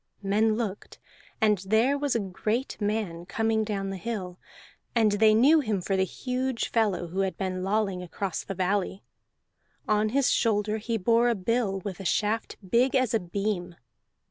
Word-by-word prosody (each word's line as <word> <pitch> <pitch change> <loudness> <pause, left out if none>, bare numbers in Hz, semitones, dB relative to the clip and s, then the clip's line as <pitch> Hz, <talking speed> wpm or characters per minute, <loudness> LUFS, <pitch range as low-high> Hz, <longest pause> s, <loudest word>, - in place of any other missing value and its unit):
Men 215 +3 +2
looked, 215 -4 -5 0.4
and 210 -3 +3
there 220 +8 +2
was 285 -2 -1
a - - +2
great 210 +6 -2
man 205 -5 -2
coming 220 +1 +1
down 200 -2 -3
the 195 - -4
hill, 185 -4 -5 0.6
and 220 -3 +4
they 215 +1 +4
knew 285 +8 +6
him 215 -8 -1
for 195 +2 -1
the 190 0 +2
huge 255 +3 -2
fellow 205 -7 0
who 185 +3 -4
had 190 -1 0
been 185 -1 -2
lolling 195 -2 0
across 180 +1 -4
the 195 - -6
valley. 190 +1 -1 0.8
On 215 0 +2
his 275 +3 +2
shoulder 215 -1 +1
he 225 +1 -2
bore 230 +4 +3
a 235 - +2
bill 200 -1 -1
with 190 0 -6
a 195 - -7
shaft 215 +4 0
big 245 +7 +3
as 255 -3 +2
a 225 - +3
beam. 180 -1 -3
210 Hz, 170 wpm, -27 LUFS, 190-230 Hz, 0.8 s, knew